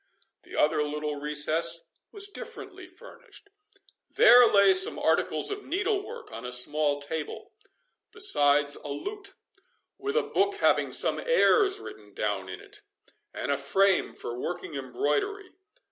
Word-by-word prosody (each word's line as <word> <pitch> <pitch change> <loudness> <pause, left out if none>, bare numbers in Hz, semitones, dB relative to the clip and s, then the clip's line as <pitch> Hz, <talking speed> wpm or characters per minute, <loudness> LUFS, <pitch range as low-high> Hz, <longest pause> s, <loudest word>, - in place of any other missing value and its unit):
The - - -12
other 150 0 +2
little 150 0 -4
recess 155 +3 -1 0.3
was 405 -2 -5
differently 405 -4 -8
furnished. 475 +2 -16 0.6
There 245 +1 +7
lay 200 - +5
some 375 +4 +3
articles - - 0
of 410 0 -5
needle 395 +5 -1
work - - -10
on 115 +1 -8
a 125 - -6
small 145 +3 0
table, 150 +2 -6 0.6
besides 145 - +2
a - - -11
lute, 400 - -7 0.6
with 415 +2 -3
a - - +2
book 400 +1 0
having 415 - +2
some - - +3
airs 430 -5 +3
written 105 - -12
down 100 -3 -3
in 95 - -7
it, - - -12 0.5
and - - -4
a 140 - +1
frame 190 +7 +1
for 120 +1 -6
working 170 +2 -5
embroidery. 145 - -2
170 Hz, 140 wpm, -27 LUFS, -, 0.6 s, There